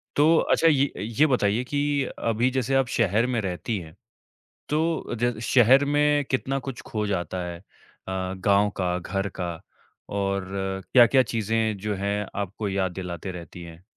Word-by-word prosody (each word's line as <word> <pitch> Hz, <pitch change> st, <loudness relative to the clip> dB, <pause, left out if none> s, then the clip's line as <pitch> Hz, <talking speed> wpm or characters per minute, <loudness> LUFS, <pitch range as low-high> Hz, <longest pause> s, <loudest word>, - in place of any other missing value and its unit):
तो 160 Hz, +3 st, +5 dB
अच्छा, 165 Hz, -, +3 dB
ये 140 Hz, -2 st, +3 dB
ये 115 Hz, +8 st, +2 dB
बताइए 120 Hz, -4 st, +1 dB
कि 145 Hz, +1 st, 0 dB, 0.2 s
अभी 115 Hz, +2 st, +1 dB
जैसे 130 Hz, +1 st, 0 dB
आप 135 Hz, -2 st, +3 dB
शहर 115 Hz, +1 st, +2 dB
में 125 Hz, -2 st, 0 dB
रहती 95 Hz, +3 st, -3 dB
हैं, 80 Hz, -2 st, -11 dB, 0.7 s
तो 160 Hz, -2 st, -1 dB
ज 120 Hz, -1 st, -1 dB
शहर 130 Hz, +4 st, +5 dB
में 145 Hz, 0 st, +2 dB
कितना 135 Hz, +1 st, 0 dB
कुछ 135 Hz, -2 st, -7 dB
खो 105 Hz, -1 st, -2 dB
जाता 90 Hz, -1 st, -2 dB
है 85 Hz, -1 st, -6 dB
अ, -, -, -22 dB, 0.5 s
गाँव 95 Hz, +2 st, +1 dB
का, 90 Hz, -1 st, 0 dB
घर 95 Hz, +3 st, -3 dB
का, 90 Hz, -1 st, -2 dB, 0.6 s
और 100 Hz, -1 st, -1 dB, 0.5 s
क्या-क्या 130 Hz, +1 st, +7 dB
चीज़ें 110 Hz, -1 st, -1 dB
जो 105 Hz, -1 st, -2 dB
हैं 100 Hz, +1 st, -2 dB
आपको 100 Hz, +1 st, -3 dB
याद 95 Hz, -1 st, 0 dB
दिलाते 90 Hz, +1 st, -6 dB
रहती 85 Hz, 0 st, -9 dB
हैं? 85 Hz, +1 st, -12 dB
110 Hz, 160 wpm, -25 LUFS, 95-130 Hz, 0.7 s, क्या-क्या